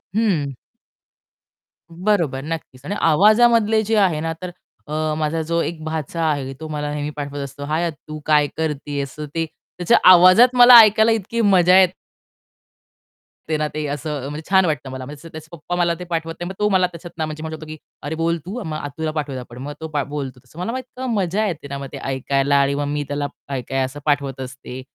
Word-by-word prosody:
हं. 175 -11 +1 1.3
बरोबर, 170 -6 0
नक्कीच. 155 -5 -6
आणि 205 - -3
आवाजामधले 215 +6 +4
जे 220 +1 0
आहे 185 -7 +3
ना, 165 0 -2
तर 180 - -5 0.4
अ, 155 0 -1
माझा 155 +1 -1
जो 170 +1 0
एक 160 -2 -4
भाचा 160 +1 -3
आहे, 140 -4 -1
तो 160 - -6
मला 150 -1 -3
नेहमी 150 0 -3
पाठवत 145 -1 -5
असतो, 140 +1 -8
"हाय 155 +3 -1
आत्तु 155 -1 -6
काय 150 -1 +4
करतीयेस?" 145 -3 -3
ते 155 +2 -3
त्याच्या 175 +2 -1
आवाजात 185 +8 +7
मला 245 0 +10
ऐकायला 220 +1 +4
इतकी 225 +1 -1
मजा 185 -3 +5
येते 185 -1 0 1.4
ना, 150 0 -1
ते 155 -1 -3
असं 145 -1 -4
अ, - - -4
म्हणजे 150 +2 -6
छान 190 -1 +5
वाटतं 145 -5 -2
मला 130 -1 -6
म्हणजे 150 +4 -10
त्याचे 155 0 -10
पप्पा 170 +1 -5
मला 175 -1 +2
ते - - -5
पाठवत 165 -1 -2
नाही, 175 - -4
मग - - -5
तो 210 - +2
मला 185 -2 +3
त्याच्यातन 170 -1 -10
म्हणजे 155 0 -5
म्हणू 160 0 -5
शकतो 155 - -10
की 155 0 -8 0.3
"अरे 145 +2 -3
बोल 165 +1 0
तू 215 +5 -5
मग 155 -1 -4
आत्तुला 155 +2 -4
पाठवूयात 145 -4 -4
आपण." 120 - -13
मग 145 +1 -5
तो 160 - -4 0.2
बोलतो 135 -4 -5
तसं. 170 - -15
मला 185 +5 -2
मग 255 - -3
इतकं 255 0 -7
मज्जा 200 +2 0
येते 160 -6 -5
ना 140 0 -5
मग 140 0 -6
ते - - -5
ऐकायला 135 +1 0
आणि 140 0 +1
मग 145 0 -1
मी 145 0 -2
त्याला 145 0 -2 0.2
काय-काय 135 0 -2
असं 130 +3 -8
पाठवत 140 -3 0
असते. 130 0 -8
155 Hz, 200 wpm, -21 LUFS, 145-180 Hz, 1.4 s, मला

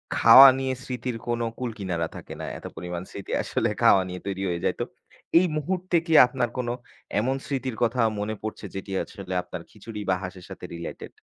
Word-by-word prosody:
খাওয়া 130 +4 +10
নিয়ে 130 -1 -1
স্মৃতির 125 -2 -4
কোনো 120 -1 0
কুলকিনারা 95 -9 -2
থাকে - - -8
না। - - -4
এত - - -13
পরিমাণ 90 -1 -5
স্মৃতি 100 - -8
আসলে - - 0
খাওয়া 95 - +6
নিয়ে 90 0 -6
তৈরি 95 -1 -3
হয়ে 85 -1 -2
যায়। - - +1
তো - - 0 0.5
এই 185 - +3
মুহূর্তে 185 +4 -2
কি 165 - 0
আপনার 125 -1 -1
কোনো 120 -2 -1 0.5
এমন 130 +5 +1
স্মৃতির 130 -3 -3
কথা 120 +2 +1 0.2
মনে 105 +1 -2
পড়ছে, 110 -1 -5
যেটি 95 +1 -6
আসলে 95 -2 -8
আপনার - - -7
খিচুড়ি 110 -2 -9
বা 95 - +4
হাঁসের 90 -1 -7
সাথে - - -8
related? 85 0 -7
115 Hz, 185 wpm, -26 LUFS, 95-130 Hz, 0.5 s, খাওয়া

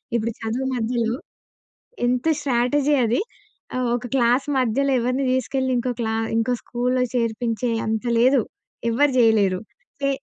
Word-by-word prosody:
ఇప్పుడు 230 0 -1
చదువు 240 +4 -2
మధ్యలో 230 0 0 0.9
ఎంత 250 +4 0
స్ట్రాటజీ 280 +2 +1
అది. 230 +3 +1 0.6
ఆహ్, 250 -1 0
ఒక 245 +1 -6
క్లాస్ 245 +2 +3
మధ్యలో 265 +3 +1
ఎవరిని 255 +3 0
తీసుకెళ్ళి 260 0 0
ఇంకో 245 +1 -1
క్లా 220 0 -1 0.2
ఇంకో 245 +2 +1
స్కూల్‌లో 250 +1 0
చేర్పించే 230 0 -1
అంత 220 +2 -1 0.2
లేదు. 255 -1 +4 0.5
ఎవ్వరు 280 +4 +3
జేయలేరు. 210 -5 +3 0.4
చే 275 - +1
245 Hz, 130 wpm, -22 LUFS, 230-260 Hz, 0.9 s, లేదు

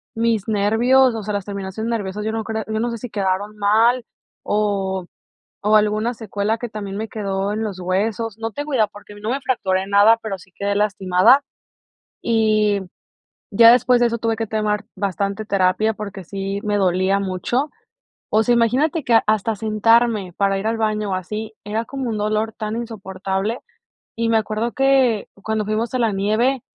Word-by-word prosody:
mis 225 -3 0
nervios, 230 +5 +3
o 220 - -4
sea, 210 +1 -3
las 200 -2 -2
terminaciones 200 +2 -5
nerviosas, 210 -3 -3
yo 220 - -1
no 225 0 -2
creo 220 0 -3
yo 220 0 -2
no 235 +1 -1
sé 230 - -5
si 245 - -7
quedaron 200 +1 -2
mal 225 +4 +3 0.4
o 195 -3 -1 0.6
o 210 +1 +4
alguna 215 +2 +2
secuela 215 -1 -2
que 240 +1 -5
también 200 -2 -6
me 220 +1 -3
quedó 200 -3 -2
en 215 +1 -2
los 200 -4 -4
huesos. 205 +4 -1
No 225 0 -4
te 290 - -4
cuida 265 -8 +1
porque, 205 0 -14
no 210 +2 -4
me 275 +2 -2
fracturé 190 -7 0
nada, 205 +3 +5
pero 205 -3 -4
sí 185 +1 -18
quedé 200 0 -2
lastimada 205 +4 +4 0.8
y 215 -3 +2 0.7
ya 230 +3 +8
después 245 0 +4
de 240 - +4
eso 235 0 -2
tuve 225 -1 -1
que 225 0 -2
tomar 210 -1 -1
bastante 200 +1 -2
terapia 200 +2 +2
porque, 205 -2 -7
sí 195 +2 -4
me 210 -1 0
dolía 190 +1 +2
mucho. 200 - -1 0.6
O 215 - +4
sea, 240 +2 +3
imagínate 265 +7 +1
que 230 -3 +5
hasta 215 +1 +1
sentarme 220 -2 +2
para 195 -1 +1
ir 195 - -4
al 225 0 0
baño 215 -2 -1
o - - 0
así 210 +4 -5
era 220 +2 -2
como 270 0 -4
un 220 - -2
dolor 215 +1 0
tan 215 0 -4
insoportable. 195 -1 -3 0.6
Y 230 0 0
me 230 - +3
acuerdo 220 +2 -2
que 265 -5 +2
cuando 220 0 -1
fuimos 215 +4 -2
a - - +1
la 230 -3 +1
nieve 220 +6 +1
215 Hz, 180 wpm, -21 LUFS, 200-230 Hz, 0.8 s, ya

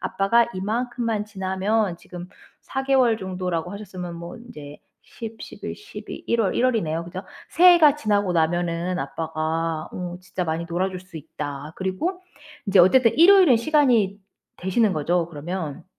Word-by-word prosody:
'아빠가 230 +5 +2
이만큼만 230 +2 -2
지나면' 195 0 -1
지금 180 0 -10 0.3
4 270 - -4
개월 260 -4 +3
정도라고 180 -3 -3
하셨으면 185 -4 -7
뭐 170 +7 -8
인제 150 -12 -11 0.2
10, 225 -1 -9
11, - - -7
12, 415 - -10
1 235 - +1
월, 200 - 0
1 245 - +2
월이네요. 170 -10 0
그죠? 180 +2 -7 0.3
"새해가 340 -4 +7
지나고 205 -8 0
나면은 175 +2 0
아빠가 160 0 -3
어 180 -1 -5
진짜 185 0 -5
많이 160 0 -2
놀아줄 185 +2 -2
수 185 -2 -13
있다." 150 -1 -7
그리고 190 - -2 0.5
이제 195 -2 +5
어쨌든 230 +6 +5
일요일은 350 -6 +7
시간이 235 -7 +2 0.4
되시는 190 +3 +1
거죠 170 +2 0
그러면? 165 0 -6
190 Hz, 295 characters per minute, -23 LUFS, 170-230 Hz, 0.5 s, 새해가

